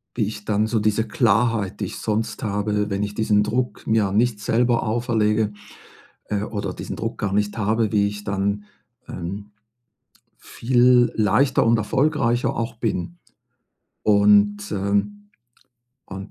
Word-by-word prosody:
Wie 110 - +1
ich 105 -1 -7
dann 105 0 +1
so 110 -1 0
diese 110 +1 +1
Klarheit, 115 - +1
die - - -1
ich - - -7
sonst 110 +1 -2
habe, 105 0 -1
wenn 100 +1 -1
ich 105 0 -6
diesen 105 -2 +2
Druck 125 +3 -2
mir 110 -3 +2
nicht 110 +1 +1
selber 120 +2 +1
auferlege, 110 -2 0 0.7
äh, 105 0 -2
oder 105 -2 -4
diesen - - -6
Druck 115 0 -4
gar 100 -2 -2
nicht 105 +1 0
habe, 110 +1 0
wie 100 -1 +2
ich 105 0 -6
dann, 100 +1 -2 0.4
ähm, 100 +4 -7 0.9
viel 125 0 +2
leichter 115 +5 +2
und 115 0 +4
erfolgreicher 120 +1 0
auch 115 0 -3
bin. 90 -7 -3 0.9
Und, 105 0 +3
ähm, 100 +1 -2 0.8
und 95 +1 -8
105 Hz, 140 wpm, -22 LUFS, 105-115 Hz, 0.9 s, und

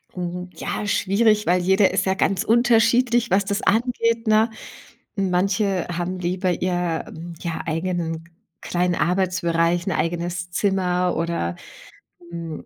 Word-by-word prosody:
Mhm, 180 0 -5
ja, 210 - -4
schwierig, 210 +2 +2
weil 180 +1 +2
jeder 190 +2 +3
ist 185 0 0
ja 190 0 +1
ganz 195 -1 +1
unterschiedlich, 235 +1 +3
was 195 +1 +2
das 200 +1 -1
angeht, 230 +1 +1
ne? 220 +1 +4 0.7
Manche 195 0 0
haben 175 +1 -3
lieber 180 +1 -1
ihr, 175 -2 -1
hm, 170 +1 -9
ja, 170 -2 -3
eigenen 165 0 -2 0.4
kleinen 180 0 0
Arbeitsbereich, 175 -2 +1
'n 190 - -1
eigenes 175 +1 -2
Zimmer 180 -2 0
oder, 165 - -2 0.8
hm, 165 -2 -6
180 Hz, 130 wpm, -22 LUFS, 175-200 Hz, 0.8 s, ne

